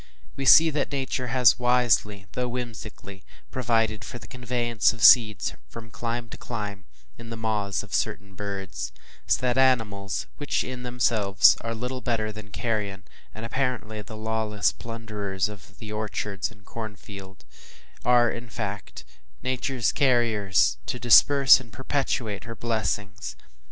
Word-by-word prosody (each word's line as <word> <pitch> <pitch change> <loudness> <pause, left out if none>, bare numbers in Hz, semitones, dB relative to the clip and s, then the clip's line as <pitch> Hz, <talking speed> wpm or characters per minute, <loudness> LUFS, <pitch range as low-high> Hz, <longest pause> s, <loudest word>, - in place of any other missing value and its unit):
We 135 - -4
see 160 +4 +8
that 145 -1 -2
Nature 130 -2 -2
has 125 -1 +4
wisely, 120 -5 +2
though 125 0 -2
whimsically 110 -5 -7 0.3
provided 115 -4 0
for 120 - -7
the 115 - -12
conveyance 120 -2 0
of 115 -2 -7
seeds 110 -6 +6 0.2
from 115 -1 -10
clime 115 +1 -4
to - - -9
clime, 105 -4 -6 0.3
in 115 -1 -10
the 115 - -6
maws 105 -3 -1
of - - -12
certain 100 +1 -2
birds; 95 -9 -5 0.4
so - - +3
that 125 0 +1
animals, 105 - +1
which, - - -1
in 125 -1 -6
themselves, 115 -5 +3
are 115 0 -4
little 125 +3 -4
better 115 -3 -1
than 105 0 -10
carrion, 105 -3 -3 0.3
and 110 +1 -6
apparently 115 -4 -2
the 110 +2 -10
lawless 110 -1 0
plunderers 105 -5 -4
of 105 -3 -12
the 110 -1 -8
orchard 105 -2 -3
and 110 -2 -18
the - - -28
corn 110 -2 -6
field, 95 -1 -12 0.6
are, 120 -1 +4
in 120 0 -7
fact, 105 -3 -6 0.4
Nature’s 130 -2 0
carriers 110 - +2
to - - -2
disperse 135 +3 +7
and 120 -3 -13
perpetuate 130 -6 -2
her 115 0 -7
blessings. 100 - -3
115 Hz, 145 wpm, -26 LUFS, 105-125 Hz, 0.6 s, see